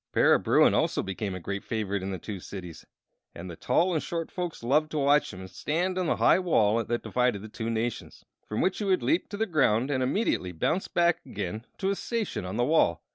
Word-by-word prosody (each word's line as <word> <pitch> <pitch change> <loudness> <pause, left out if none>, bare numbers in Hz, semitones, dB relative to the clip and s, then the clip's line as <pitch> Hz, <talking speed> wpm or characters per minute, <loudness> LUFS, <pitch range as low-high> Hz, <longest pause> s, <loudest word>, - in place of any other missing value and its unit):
Para - - +5
Bruin - - +4
also - - +1
became 95 0 -4
a - - -5
great 100 +3 -4
favorite 100 -3 -2
in 95 - -4
the 95 - -3
two 100 +3 -6
cities, 90 -3 -9 0.5
and 90 +1 -7
the - - -8
tall 180 - +1
and 155 - 0
short 165 -1 -4
folks 175 -8 -5
loved 150 +6 +2
to 155 - -4
watch 145 +1 +3
him 95 0 -9
stand 170 - -2
upon 185 -2 -1
the - - +2
high - - +4
wall 115 - +2
that 120 +2 -2
divided 125 -5 0
the - - -7
two 110 +1 -4
nations, 115 +1 -3 0.2
from 105 - -2
which 190 - +1
he - - -2
would 190 -2 +1
leap 330 +3 +1
to 205 - -5
the 220 - +1
ground 135 - +2
and 130 -2 0
immediately 130 - 0
bound 155 - 0
back 175 0 +3
again 105 +3 -5
to 195 - -1
his 200 - -1
station 230 - -3
on 95 +4 -4
the 120 - +2
wall. 150 - +2
120 Hz, 230 wpm, -27 LUFS, -, 0.5 s, Para